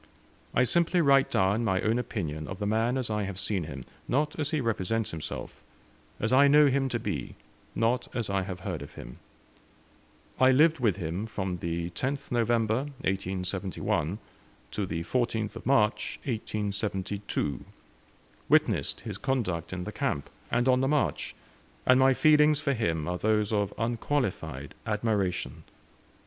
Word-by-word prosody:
I 125 Hz, -, +5 dB
simply 170 Hz, +7 st, +2 dB
write 140 Hz, -4 st, +5 dB
down 100 Hz, +4 st, +2 dB
my 95 Hz, -4 st, +1 dB
own 115 Hz, +3 st, +1 dB
opinion 80 Hz, -10 st, -4 dB
of 95 Hz, -, -6 dB
the 105 Hz, -, -3 dB
man 115 Hz, +4 st, +1 dB
as 125 Hz, -4 st, -2 dB
I 105 Hz, 0 st, 0 dB
have 95 Hz, -1 st, -5 dB
seen 100 Hz, -4 st, -1 dB
him, 70 Hz, -5 st, -7 dB, 0.2 s
not 150 Hz, +5 st, 0 dB
as 145 Hz, -, 0 dB
he 155 Hz, -, 0 dB
represents 115 Hz, -2 st, -1 dB
himself; 80 Hz, -2 st, -6 dB, 0.6 s
as 110 Hz, +3 st, 0 dB
I 140 Hz, +2 st, +7 dB
know 150 Hz, +1 st, +7 dB
him 135 Hz, 0 st, +1 dB
to 120 Hz, -, 0 dB
be, -, -, -4 dB, 0.4 s
not 115 Hz, +2 st, +1 dB
as 120 Hz, -4 st, -1 dB
I 100 Hz, -1 st, 0 dB
have 95 Hz, -1 st, -6 dB
heard -, -, -4 dB
of -, -, -9 dB
him. -, -, -10 dB, 1.2 s
I 130 Hz, -, +6 dB
lived 155 Hz, +4 st, +5 dB
with 110 Hz, -7 st, +2 dB
him 90 Hz, +3 st, -3 dB
from 95 Hz, -4 st, -3 dB
the 85 Hz, 0 st, -3 dB
10th 135 Hz, +10 st, -3 dB
November, 115 Hz, +1 st, +1 dB, 0.2 s
1871, 95 Hz, -2 st, -1 dB, 0.5 s
to 100 Hz, -2 st, -2 dB
the 80 Hz, -1 st, -3 dB
14th 115 Hz, 0 st, -1 dB
March, 115 Hz, -5 st, +2 dB
1872; 100 Hz, -, -2 dB, 0.9 s
witnessed -, -, +2 dB
his -, -, -6 dB
conduct 100 Hz, -, -1 dB
in 90 Hz, -1 st, -4 dB
the -, -, -5 dB
camp, 70 Hz, -, -2 dB, 0.2 s
and 120 Hz, +2 st, +1 dB
on 130 Hz, 0 st, +4 dB
the 135 Hz, -, +2 dB
march, 150 Hz, 0 st, 0 dB, 0.5 s
and 130 Hz, 0 st, +6 dB
my 130 Hz, 0 st, +5 dB
feelings 150 Hz, 0 st, +5 dB
for 140 Hz, -2 st, 0 dB
him 80 Hz, -, -1 dB
are 90 Hz, 0 st, -2 dB
those 105 Hz, +1 st, +1 dB
of 100 Hz, -1 st, +1 dB
unqualified 115 Hz, -, -2 dB
admiration. 105 Hz, -4 st, -1 dB
110 Hz, 155 wpm, -28 LUFS, 95-130 Hz, 1.2 s, I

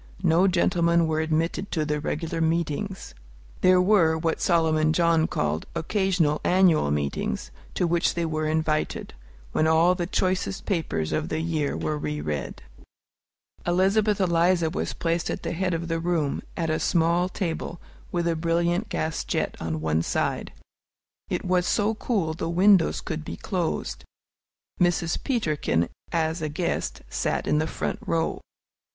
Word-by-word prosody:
No 175 Hz, +4 st, +4 dB
gentlemen 170 Hz, -2 st, +3 dB
were 155 Hz, -1 st, 0 dB
admitted 160 Hz, +5 st, -1 dB
to 155 Hz, -3 st, 0 dB
the 150 Hz, 0 st, -1 dB
regular 160 Hz, +2 st, -3 dB
meetings. 165 Hz, -, -1 dB, 0.5 s
There 185 Hz, 0 st, +5 dB
were 180 Hz, -4 st, +4 dB
what 160 Hz, 0 st, -1 dB
Solomon 155 Hz, -2 st, +3 dB
John 165 Hz, -1 st, +3 dB
called 75 Hz, +1 st, -2 dB
"occasional 170 Hz, -3 st, +1 dB
annual 180 Hz, -, +4 dB
meetings," 75 Hz, -1 st, -2 dB, 0.2 s
to 180 Hz, -, +1 dB
which 170 Hz, 0 st, +1 dB
they 170 Hz, -1 st, 0 dB
were 155 Hz, -1 st, -1 dB
invited, 155 Hz, -1 st, -1 dB, 0.4 s
when 155 Hz, -, +2 dB
all 165 Hz, +3 st, +5 dB
the 175 Hz, -2 st, -3 dB
choicest 185 Hz, +1 st, -1 dB
papers 140 Hz, -, -1 dB
of 155 Hz, -, -1 dB
the 155 Hz, -, -1 dB
year 160 Hz, -, -1 dB
were 80 Hz, -2 st, -2 dB
re 75 Hz, 0 st, -3 dB
read. 75 Hz, -3 st, -4 dB, 1.0 s
Elizabeth 195 Hz, +4 st, +2 dB
Eliza 170 Hz, -2 st, +2 dB
was 190 Hz, -, -2 dB
placed 170 Hz, 0 st, -1 dB
at -, -, -4 dB
the -, -, -2 dB
head 180 Hz, 0 st, -1 dB
of 165 Hz, +1 st, -4 dB
the 165 Hz, 0 st, -1 dB
room, 165 Hz, -4 st, 0 dB, 0.2 s
at 165 Hz, -2 st, 0 dB
a 155 Hz, -, 0 dB
small 170 Hz, +1 st, +2 dB
table, 170 Hz, -2 st, -4 dB, 0.3 s
with 170 Hz, -1 st, 0 dB
a 170 Hz, -, +1 dB
brilliant 170 Hz, +5 st, 0 dB
gas 160 Hz, 0 st, -2 dB
jet -, -, -2 dB
on 80 Hz, -1 st, -3 dB
one 80 Hz, 0 st, +1 dB
side. -, -, -1 dB, 0.8 s
It -, -, -2 dB
was 180 Hz, -1 st, +2 dB
so 210 Hz, +1 st, +2 dB
cool 200 Hz, -8 st, -1 dB
the 165 Hz, -, -4 dB
windows 185 Hz, +1 st, +4 dB
could 155 Hz, -, -4 dB
be -, -, -6 dB
closed. 180 Hz, -5 st, -3 dB, 0.8 s
Mrs. 175 Hz, -2 st, +1 dB
Peterkin, 155 Hz, -, 0 dB, 0.2 s
as 160 Hz, 0 st, 0 dB
a 155 Hz, -, -2 dB
guest, 165 Hz, +4 st, -2 dB
sat -, -, -1 dB
in 150 Hz, -, +2 dB
the 155 Hz, -, 0 dB
front -, -, -3 dB
row. 165 Hz, -1 st, -1 dB
165 Hz, 155 wpm, -25 LUFS, 155-180 Hz, 1.0 s, There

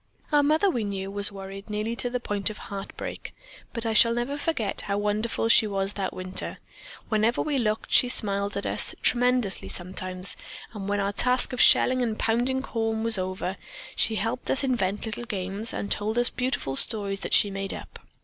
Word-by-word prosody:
"Our 295 Hz, -1 st, +5 dB
mother, 310 Hz, +6 st, +3 dB
we 245 Hz, -, 0 dB
knew, 195 Hz, -1 st, -4 dB
was 205 Hz, +1 st, +3 dB
worried 195 Hz, +1 st, -9 dB
nearly 210 Hz, +2 st, -2 dB
to 245 Hz, -, +1 dB
the 250 Hz, +1 st, -2 dB
point 205 Hz, -3 st, -1 dB
of 215 Hz, -, -8 dB
heartbreak, 195 Hz, -1 st, -7 dB, 0.4 s
but 230 Hz, -1 st, -5 dB
I 225 Hz, -, 0 dB
shall 230 Hz, +2 st, +5 dB
never 240 Hz, +4 st, -2 dB
forget 290 Hz, -9 st, -1 dB
how 200 Hz, 0 st, -2 dB
wonderful 210 Hz, +3 st, -1 dB
she 230 Hz, -1 st, +5 dB
was 195 Hz, 0 st, -2 dB
that 195 Hz, -2 st, -3 dB
winter. 185 Hz, 0 st, -5 dB, 0.5 s
Whenever 220 Hz, +2 st, +1 dB
we 295 Hz, -3 st, -1 dB
looked, 215 Hz, -2 st, -2 dB
she 250 Hz, -, +5 dB
smiled 200 Hz, -4 st, +1 dB
at 200 Hz, -, -4 dB
us, -, -, +2 dB
tremulously 245 Hz, -4 st, +2 dB
sometimes, 185 Hz, +1 st, -2 dB, 0.4 s
and 200 Hz, -2 st, -6 dB
when 205 Hz, 0 st, 0 dB
our 200 Hz, 0 st, -1 dB
task 250 Hz, +4 st, +2 dB
of 250 Hz, -, +1 dB
shelling 255 Hz, 0 st, +5 dB
and 225 Hz, -3 st, -1 dB
pounding 245 Hz, +4 st, 0 dB
corn 225 Hz, -3 st, -2 dB
was 225 Hz, -3 st, +2 dB
over, 185 Hz, +1 st, -3 dB, 0.4 s
she 225 Hz, -, +3 dB
helped 225 Hz, +4 st, -2 dB
us 270 Hz, -, +2 dB
invent 210 Hz, -7 st, 0 dB
little 225 Hz, +2 st, -3 dB
games 200 Hz, +1 st, -1 dB
and 200 Hz, -, -5 dB
told 215 Hz, +2 st, -1 dB
us 240 Hz, 0 st, +3 dB
beautiful 250 Hz, -, -2 dB
stories 200 Hz, +4 st, +3 dB
that -, -, +1 dB
she 205 Hz, -, +4 dB
made 195 Hz, 0 st, -4 dB
up. -, -, -9 dB
215 Hz, 190 wpm, -26 LUFS, 195-240 Hz, 0.5 s, Our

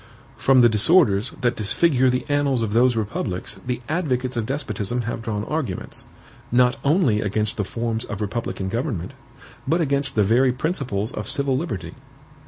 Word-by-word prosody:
From 130 Hz, -1 st, +4 dB
the 120 Hz, -, +7 dB
disorders 110 Hz, -, +3 dB
that 120 Hz, -1 st, +1 dB
disfigure 130 Hz, +5 st, +3 dB
the 125 Hz, 0 st, -1 dB
annals 140 Hz, -4 st, +1 dB
of 105 Hz, -2 st, -2 dB
those 120 Hz, +1 st, +4 dB
republics 105 Hz, -3 st, -3 dB
the 125 Hz, -1 st, -2 dB
advocates 130 Hz, -6 st, -1 dB
of 115 Hz, -2 st, -2 dB
despotism 120 Hz, -4 st, -2 dB
have 120 Hz, 0 st, -4 dB
drawn 105 Hz, -2 st, -3 dB
arguments, 135 Hz, -, -3 dB, 0.5 s
not 125 Hz, +1 st, +4 dB
only 140 Hz, -, +3 dB
against 105 Hz, +1 st, -1 dB
the 105 Hz, -, -1 dB
forms 115 Hz, +2 st, -3 dB
of 105 Hz, -, -6 dB
republican 105 Hz, -2 st, -3 dB
government, 110 Hz, -, -3 dB, 0.5 s
but 170 Hz, -, +2 dB
against 140 Hz, -3 st, 0 dB
the 105 Hz, -, +4 dB
very 125 Hz, +6 st, +4 dB
principles 125 Hz, -, -2 dB
of -, -, -5 dB
civil 140 Hz, -2 st, 0 dB
liberty. 100 Hz, -, -4 dB
120 Hz, 160 wpm, -23 LUFS, 105-135 Hz, 0.5 s, the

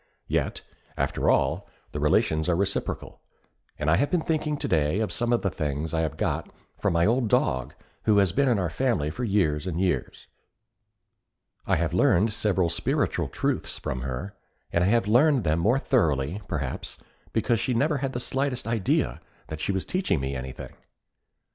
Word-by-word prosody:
Yet, -, -, -1 dB, 0.3 s
after -, -, 0 dB
all, -, -, +1 dB, 0.2 s
the -, -, -4 dB
relations 80 Hz, +2 st, +2 dB
are 85 Hz, -, +3 dB
reciprocal; 100 Hz, +3 st, -2 dB, 0.6 s
and 75 Hz, -, -3 dB
I 80 Hz, +2 st, +4 dB
have 145 Hz, -, +1 dB
been 175 Hz, -3 st, +1 dB
thinking 155 Hz, -2 st, -1 dB
today 80 Hz, -, +1 dB
of 110 Hz, -, -1 dB
some 120 Hz, -2 st, -1 dB
of 120 Hz, -, +2 dB
the 95 Hz, -, +1 dB
things 75 Hz, 0 st, -3 dB
I 80 Hz, -, +1 dB
have 80 Hz, -3 st, -2 dB
got -, -, -1 dB, 0.3 s
from -, -, +1 dB
an 85 Hz, +2 st, +4 dB
old 120 Hz, +1 st, +2 dB
dog 65 Hz, -, +1 dB, 0.3 s
who 105 Hz, -2 st, +4 dB
has 100 Hz, -3 st, +4 dB
been 140 Hz, +8 st, +2 dB
in 120 Hz, -, +3 dB
our 90 Hz, -4 st, -1 dB
family 110 Hz, -, 0 dB
for 125 Hz, -, -5 dB
years 95 Hz, -7 st, +1 dB
and 85 Hz, -2 st, -2 dB
years. 90 Hz, -9 st, -1 dB, 1.4 s
I -, -, +3 dB
have -, -, -1 dB
learned 105 Hz, +5 st, +3 dB
several 95 Hz, -4 st, +1 dB
spiritual 85 Hz, -, 0 dB
truths -, -, -2 dB
from 65 Hz, -, -4 dB
her, 65 Hz, +10 st, -4 dB, 0.4 s
and 85 Hz, -, +3 dB
I -, -, +3 dB
have 115 Hz, -1 st, +2 dB
learned 130 Hz, +3 st, +4 dB
them 80 Hz, -1 st, +1 dB
more 115 Hz, +9 st, +3 dB
thoroughly, 75 Hz, -, +1 dB
perhaps, 75 Hz, -7 st, -4 dB, 0.3 s
because 115 Hz, +1 st, +1 dB
she 125 Hz, -, 0 dB
never 145 Hz, +4 st, +2 dB
had 135 Hz, 0 st, -2 dB
the 120 Hz, -, -2 dB
slightest 135 Hz, 0 st, -2 dB
idea 105 Hz, -, 0 dB, 0.3 s
that 80 Hz, -, -5 dB
she 100 Hz, -, 0 dB
was 95 Hz, -1 st, -2 dB
teaching 185 Hz, -, 0 dB
me 65 Hz, 0 st, -3 dB
anything. 65 Hz, 0 st, -7 dB
95 Hz, 180 wpm, -26 LUFS, 80-120 Hz, 1.4 s, I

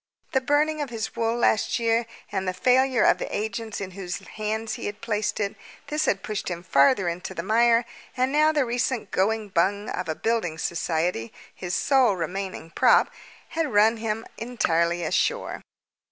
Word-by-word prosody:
The 265 Hz, -4 st, +2 dB
burning 300 Hz, +3 st, +1 dB
of 285 Hz, -, -3 dB
his 225 Hz, -2 st, -4 dB
wool 230 Hz, 0 st, 0 dB
last 220 Hz, -3 st, +2 dB
year, 230 Hz, 0 st, +1 dB, 0.2 s
and 190 Hz, -2 st, -2 dB
the 185 Hz, -, -1 dB
failure 255 Hz, +4 st, +3 dB
of -, -, +4 dB
the -, -, -4 dB
agents 220 Hz, +1 st, -4 dB
in 190 Hz, -1 st, -5 dB
whose 180 Hz, -1 st, -5 dB
hands 220 Hz, +1 st, -3 dB
he -, -, -4 dB
had 205 Hz, +1 st, -6 dB
placed 210 Hz, -2 st, -2 dB
it, 200 Hz, 0 st, -1 dB, 0.3 s
this 300 Hz, +1 st, 0 dB
had 195 Hz, 0 st, 0 dB
pushed 215 Hz, -2 st, -4 dB
him 175 Hz, -1 st, -5 dB
farther 175 Hz, -, +4 dB
into 180 Hz, +2 st, -4 dB
the 170 Hz, -, -3 dB
mire, 230 Hz, +3 st, +4 dB, 0.3 s
and 255 Hz, +1 st, +2 dB
now 305 Hz, +2 st, +4 dB
the 295 Hz, -4 st, +1 dB
recent 240 Hz, 0 st, -1 dB
"going 215 Hz, +2 st, 0 dB
bung" 200 Hz, +4 st, +1 dB
of 180 Hz, -2 st, -4 dB
a 160 Hz, -, -1 dB
building 220 Hz, -8 st, -1 dB
society 165 Hz, -7 st, -1 dB, 0.2 s
his 180 Hz, -1 st, -4 dB
sole 260 Hz, -7 st, +3 dB
remaining 180 Hz, -1 st, -4 dB
prop -, -, +4 dB, 0.4 s
had 320 Hz, -4 st, -1 dB
run 220 Hz, +2 st, +4 dB
him 225 Hz, 0 st, -3 dB
entirely 175 Hz, -8 st, 0 dB
ashore. 160 Hz, -, 0 dB
215 Hz, 175 wpm, -25 LUFS, 185-235 Hz, 0.4 s, of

